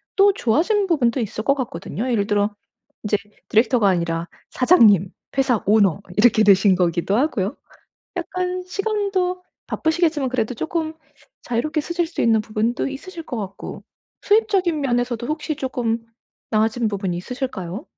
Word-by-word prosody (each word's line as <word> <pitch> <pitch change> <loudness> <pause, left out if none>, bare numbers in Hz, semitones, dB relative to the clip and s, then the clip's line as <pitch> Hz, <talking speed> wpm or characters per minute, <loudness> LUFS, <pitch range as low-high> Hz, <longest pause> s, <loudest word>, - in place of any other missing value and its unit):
또 400 0 +5
좋아진 365 - +1
부분도 265 -7 +2
있을 215 -1 -3
거 275 +3 +3
같거든요. 240 0 -4
예를 205 -3 +1
들어 205 0 +1 0.5
인제 210 -1 +1 0.3
디렉터가 225 -1 +3
아니라 170 -2 -1 0.2
사장님, 215 - +5 0.3
회사 255 -5 +2
오너 200 -3 +4 0.2
이렇게 220 0 +5
되신 195 -1 +5
거기도 175 +2 +1
하고요. 250 -5 0 0.6
약간 365 +1 -3
시간도 390 -2 -1 0.2
바쁘시겠지만 320 -4 0
그래도 250 -1 -1
쪼끔 320 +4 -3 0.5
자유롭게 300 +6 -1
쓰실 340 +2 -1
수 330 - -6
있는 225 -2 +4
부분도 215 +3 -1
있으실 330 +5 -8
것 245 - -5
같고 195 -2 -7 0.4
수입적인 395 -7 +2
면에서도 245 -3 -1
혹시 310 0 -3
쪼끔 245 -5 -1 0.5
나아진 225 +2 +1
부분이 195 -4 -2
있으실까요? 210 - -5
245 Hz, 340 characters per minute, -21 LUFS, 210-320 Hz, 0.6 s, 또